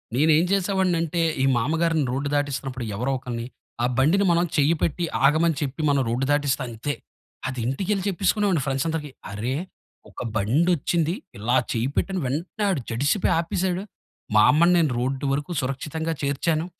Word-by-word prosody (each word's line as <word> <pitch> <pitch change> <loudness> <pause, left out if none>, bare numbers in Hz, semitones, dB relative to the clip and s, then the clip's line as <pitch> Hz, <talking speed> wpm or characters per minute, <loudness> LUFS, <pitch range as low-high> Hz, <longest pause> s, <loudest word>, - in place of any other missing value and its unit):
నేనేం 155 +4 +4
చేసేవాడిని 190 -2 +2
అంటే 170 +1 -1 0.2
ఈ - - +3
మామగారిని 160 +4 +1
రోడ్డు 135 +3 -2
దాటిస్తున్నప్పుడు 135 -3 -2
ఎవరో 125 +6 -1
ఒకరిని, 120 -2 -5 0.4
ఆ - - +4
బండిని 165 +10 +3
మనం 170 +1 +3
చెయ్యి 150 +3 +4
పెట్టి 170 +2 0 0.2
ఆగమని 155 +2 +3
చెప్పి 145 +2 -3
మనం 140 -1 +3
రోడ్డు 125 +3 0
దాటిస్తే 145 -2 +1
అంతే. 120 +5 -4 0.5
అది 130 - -4
ఇంటికెళ్లి 190 +9 -1
చెప్పికునేవాడిని 195 -3 +1
ఫ్రెండ్స్ 135 +1 -1
అందరికి. 155 -3 -3 0.2
అరె! 115 +6 -2 0.5
ఒక - - -9
బండొచ్చింది. 160 - +1 0.2
ఇలా 115 +5 0 0.2
చెయ్యి 115 +3 0
పెట్టిన 195 -1 0
వెంటనే 165 +11 -3
ఆడు 170 -9 0
జడిసిపోయి 145 - +1
ఆపేసాడు. 180 +2 -1 0.5
మా 105 - +7
అమ్మని 170 +4 +4
నేను 155 -5 +3
రోడ్డు 135 +2 -2
వరకు 145 +5 -3
సురక్షితంగా 155 +5 -3
చేర్చాను. 155 +3 0
150 Hz, 150 wpm, -24 LUFS, 130-170 Hz, 0.5 s, మా